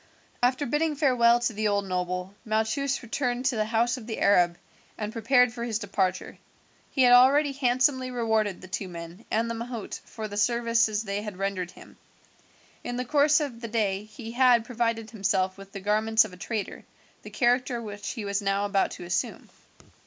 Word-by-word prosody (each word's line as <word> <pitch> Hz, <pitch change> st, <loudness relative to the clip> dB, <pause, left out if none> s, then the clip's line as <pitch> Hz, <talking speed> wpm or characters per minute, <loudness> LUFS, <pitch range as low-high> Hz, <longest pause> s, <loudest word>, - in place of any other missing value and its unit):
After 255 Hz, +4 st, +2 dB
bidding 300 Hz, +4 st, 0 dB
farewell 245 Hz, -5 st, +4 dB
to 240 Hz, -, 0 dB
the 215 Hz, +1 st, -1 dB
old 200 Hz, -1 st, 0 dB
noble, 180 Hz, 0 st, -3 dB
Malchus 220 Hz, +6 st, -1 dB
returned 245 Hz, +1 st, -2 dB
to 260 Hz, -2 st, +2 dB
the 215 Hz, -1 st, 0 dB
house 230 Hz, +3 st, +1 dB
of 230 Hz, -3 st, -10 dB
the 220 Hz, -, -4 dB
Arab 175 Hz, -3 st, +4 dB, 0.4 s
and 215 Hz, 0 st, -4 dB
prepared 245 Hz, +1 st, +3 dB
for 235 Hz, -1 st, -5 dB
his 230 Hz, -3 st, -1 dB
departure. 190 Hz, -4 st, -2 dB, 0.5 s
He 265 Hz, -, +2 dB
had 245 Hz, 0 st, +7 dB
already 275 Hz, +4 st, +6 dB
handsomely 255 Hz, 0 st, +1 dB
rewarded 220 Hz, -5 st, 0 dB
the 185 Hz, -, -10 dB
two 185 Hz, +1 st, -4 dB
men 170 Hz, +4 st, -9 dB
and 225 Hz, +2 st, 0 dB
the 230 Hz, -, -2 dB
mahout 230 Hz, -1 st, -6 dB
for 220 Hz, -1 st, -7 dB
the 205 Hz, -1 st, -7 dB
services 230 Hz, -1 st, +2 dB
they 200 Hz, -1 st, -3 dB
had 210 Hz, -3 st, -7 dB
rendered 195 Hz, -2 st, -2 dB
him. -, -, -15 dB, 0.9 s
In 245 Hz, -, -4 dB
the 250 Hz, -, -2 dB
course 295 Hz, +3 st, +4 dB
of 265 Hz, -6 st, -4 dB
the 230 Hz, -, -4 dB
day 210 Hz, -3 st, -1 dB
he 225 Hz, +1 st, -9 dB
had 245 Hz, -2 st, +4 dB
provided 230 Hz, -2 st, -2 dB
himself 195 Hz, -3 st, 0 dB
with 195 Hz, 0 st, -13 dB
the 195 Hz, -, -7 dB
garments 220 Hz, +3 st, +3 dB
of 200 Hz, -, -10 dB
a -, -, -9 dB
trader, 200 Hz, +3 st, -5 dB, 0.4 s
the -, -, -10 dB
character 245 Hz, -1 st, +1 dB
which 205 Hz, -2 st, -6 dB
he 225 Hz, -5 st, -6 dB
was 200 Hz, +1 st, -1 dB
now 195 Hz, 0 st, 0 dB
about 200 Hz, -1 st, +1 dB
to -, -, -9 dB
assume. 175 Hz, 0 st, -3 dB
225 Hz, 190 wpm, -27 LUFS, 200-245 Hz, 0.9 s, had